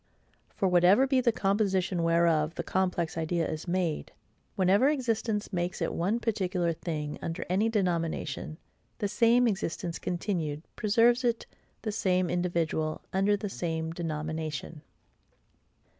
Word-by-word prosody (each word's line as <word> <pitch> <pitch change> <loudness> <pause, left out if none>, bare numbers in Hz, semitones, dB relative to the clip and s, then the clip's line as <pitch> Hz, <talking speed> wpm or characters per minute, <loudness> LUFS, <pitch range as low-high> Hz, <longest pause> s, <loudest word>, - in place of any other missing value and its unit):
For, 195 - +1
whatever 180 +7 +5
be 265 -1 +2
the 235 - +3
composition 195 -4 +1
whereof 165 -1 +2
the - - -3
complex 180 -3 -1
idea 165 +1 0
is 155 +3 -5
made, 175 -3 -1 0.4
whenever 195 +8 +4
existence 225 -7 -1
makes 175 0 -2
it - - -1
one 195 +7 0
particular 185 -7 0
thing 150 -3 -4
under 165 - -4
any 205 +5 +2
denomination, 165 -7 -1 0.4
THE 205 - -1
SAME 235 +3 +4
EXISTENCE 180 -4 -2
CONTINUED 170 -5 -2
preserves 230 +4 +3
it 235 -2 0 0.4
the 215 - -1
SAME 185 -4 +1
individual 170 -3 -1
under 195 +2 +3
the 205 - -4
same 160 -4 -3
denomination. 155 -2 -4
180 Hz, 130 wpm, -29 LUFS, 165-210 Hz, 0.4 s, whatever